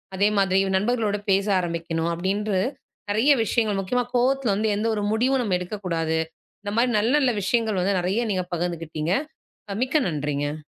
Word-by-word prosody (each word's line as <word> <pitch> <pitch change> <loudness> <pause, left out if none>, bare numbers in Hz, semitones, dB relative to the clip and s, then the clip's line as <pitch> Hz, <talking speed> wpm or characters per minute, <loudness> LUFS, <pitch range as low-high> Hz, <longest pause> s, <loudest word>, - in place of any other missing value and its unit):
அதே 200 +2 +3
மாதிரி 190 -1 +3 0.2
நண்பர்களோட 215 0 0
பேச 195 +1 +3
ஆரம்பிக்கணும் 170 -1 -2
அப்பபிடின்று 195 +3 -1 0.5
நிறைய 225 +8 +3
விஷயங்கள் 215 -2 +1
முக்கியமா 245 +6 0
கோபத்துல 250 -2 +2
வந்து 215 +2 0
எந்த 215 +2 -1
ஒரு 210 - -2
முடிவும் 255 +4 +2
நம்ம 200 -5 +1
எடுக்கக் 195 +3 -6
கூடாது. 165 -2 0 0.4
இந்தமாரி 220 +5 +1
நல்ல 225 +4 +1
நல்ல 265 -3 +3
விஷயங்கள் 220 0 +1
வந்து 195 +1 +1
நிறைய 195 +7 0
நீங்கப் 185 -2 -2
பகிர்ந்துக்கிட்டீங்க. 165 -1 -2 0.7
மிக்க 260 +4 -1
நன்றிங்க. 145 -1 -3
200 Hz, 150 wpm, -24 LUFS, 175-225 Hz, 0.7 s, அதே